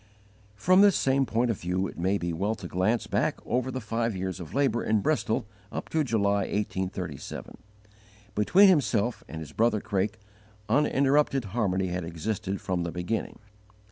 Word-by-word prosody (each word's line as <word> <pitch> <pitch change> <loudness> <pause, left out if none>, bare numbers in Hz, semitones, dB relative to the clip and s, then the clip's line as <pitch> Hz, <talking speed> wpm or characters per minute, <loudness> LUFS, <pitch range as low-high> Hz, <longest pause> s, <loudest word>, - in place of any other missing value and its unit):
From 185 - +4
this 200 -2 +6
same 135 0 +2
point 115 +2 +1
of 110 - -5
view 90 +2 -1
it - - -6
may 95 +4 +1
be 85 -2 -3
well 100 +7 -1
to 95 -5 -8
glance 100 +7 0
back - - 0
over 125 +1 0
the 130 0 -3
five 115 -1 -2
years 95 0 -3
of 85 +4 -8
labour 135 -5 +2
in 110 -1 +2
Bristol 145 -7 0 0.3
up - - -5
to 160 -1 +1
July, 100 -5 +1
1837. 95 -7 -4 0.7
Between 180 - +5
himself 125 - +2
and 80 - -7
his 75 - -8
brother 115 -1 +2
Craik 100 0 -1 0.5
uninterrupted 140 +2 +2
harmony 95 -3 0
had 90 0 -3
existed 95 +4 -3
from 90 -2 -2
the 85 -1 -3
beginning. 90 +6 -3
105 Hz, 165 wpm, -27 LUFS, 95-125 Hz, 0.7 s, this